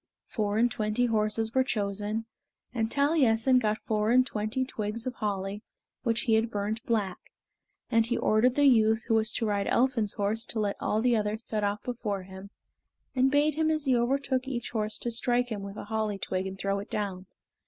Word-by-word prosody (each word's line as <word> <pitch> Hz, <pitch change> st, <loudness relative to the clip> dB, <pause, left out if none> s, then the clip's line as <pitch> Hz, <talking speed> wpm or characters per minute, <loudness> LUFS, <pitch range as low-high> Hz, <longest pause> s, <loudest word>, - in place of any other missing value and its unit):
Four 210 Hz, -2 st, -2 dB
and 240 Hz, +2 st, +3 dB
twenty 215 Hz, +3 st, 0 dB
horses 220 Hz, 0 st, 0 dB
were 260 Hz, -, +4 dB
chosen, 210 Hz, -1 st, -2 dB, 0.5 s
and 225 Hz, -2 st, 0 dB
Taliessin 265 Hz, -4 st, +3 dB
got 215 Hz, -2 st, 0 dB
four 215 Hz, -1 st, 0 dB
and 255 Hz, +2 st, +5 dB
twenty 215 Hz, +3 st, -2 dB
twigs 220 Hz, -1 st, -4 dB
of 255 Hz, -, -2 dB
holly 200 Hz, -2 st, -3 dB, 0.4 s
which 230 Hz, -1 st, 0 dB
he 230 Hz, -, +1 dB
had 220 Hz, +1 st, +3 dB
burnt 210 Hz, +1 st, -3 dB
black, 205 Hz, -5 st, 0 dB, 0.7 s
and 230 Hz, -1 st, +4 dB
he 235 Hz, +2 st, -1 dB
ordered 240 Hz, +4 st, +3 dB
the 290 Hz, -, +4 dB
youth 225 Hz, -3 st, +4 dB
who -, -, -1 dB
was 220 Hz, 0 st, +3 dB
to 230 Hz, -, -1 dB
ride 205 Hz, -2 st, 0 dB
Elphin's 235 Hz, -5 st, +2 dB
horse 215 Hz, +3 st, -1 dB
to 225 Hz, -, -3 dB
let 205 Hz, -2 st, 0 dB
all 215 Hz, -, 0 dB
the 245 Hz, -1 st, +3 dB
others 215 Hz, +1 st, -2 dB
set 215 Hz, -1 st, -2 dB
off 205 Hz, +1 st, -1 dB
before 210 Hz, -6 st, -3 dB
him, 190 Hz, +1 st, -11 dB, 0.7 s
and 260 Hz, +1 st, +4 dB
bade 290 Hz, +2 st, +3 dB
him 315 Hz, +1 st, +1 dB
as 310 Hz, -1 st, 0 dB
he 260 Hz, -2 st, +3 dB
overtook 260 Hz, +2 st, 0 dB
each 245 Hz, -3 st, -4 dB
horse 215 Hz, -2 st, -1 dB
to 240 Hz, -, -3 dB
strike 245 Hz, +1 st, +1 dB
him 215 Hz, -3 st, -4 dB
with 200 Hz, +1 st, -8 dB
a -, -, -6 dB
holly 215 Hz, -1 st, -2 dB
twig 185 Hz, 0 st, -2 dB
and 190 Hz, 0 st, -7 dB
throw 195 Hz, 0 st, -1 dB
it 200 Hz, -, -8 dB
down. 190 Hz, -3 st, -3 dB
220 Hz, 200 wpm, -28 LUFS, 210-245 Hz, 0.7 s, and